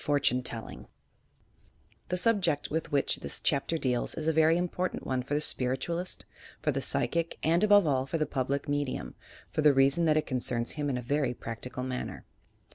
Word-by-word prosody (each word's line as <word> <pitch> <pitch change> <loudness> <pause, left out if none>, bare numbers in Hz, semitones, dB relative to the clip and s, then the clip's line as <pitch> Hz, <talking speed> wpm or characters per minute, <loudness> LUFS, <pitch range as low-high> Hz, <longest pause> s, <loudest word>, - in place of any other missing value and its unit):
FORTUNE 145 -4 +2
TELLING 115 -2 -5 1.2
The 180 - 0
subject 180 -7 +1
with 160 +1 -2
which 140 -1 +2
this - - -4
chapter 150 +3 +1
deals 125 -5 0
is 155 -1 -4
a 160 - +3
very 160 +1 +4
im 180 0 0
portant 180 +1 -3
one 130 -1 -1
for 140 +3 -3
the 150 - +1
Spiritualist, 150 +7 -1 0.3
for - - 0
the - - -2
Psychic, 170 0 0
and 170 +4 +3
above 205 -3 +6
all 135 -3 +1
for 150 - -1
the 155 - +1
Public 135 0 -2
Medium, 145 -2 -2 0.4
for - - 0
the 150 -2 +5
reason 140 +5 +4
that 155 -1 +3
it 155 - +1
concerns 120 -2 -2
him 145 -2 -2
in 130 - -1
a 125 - -5
very 140 0 0
practical 120 +3 -6
manner. 130 -1 -5
145 Hz, 190 wpm, -29 LUFS, 130-165 Hz, 1.2 s, above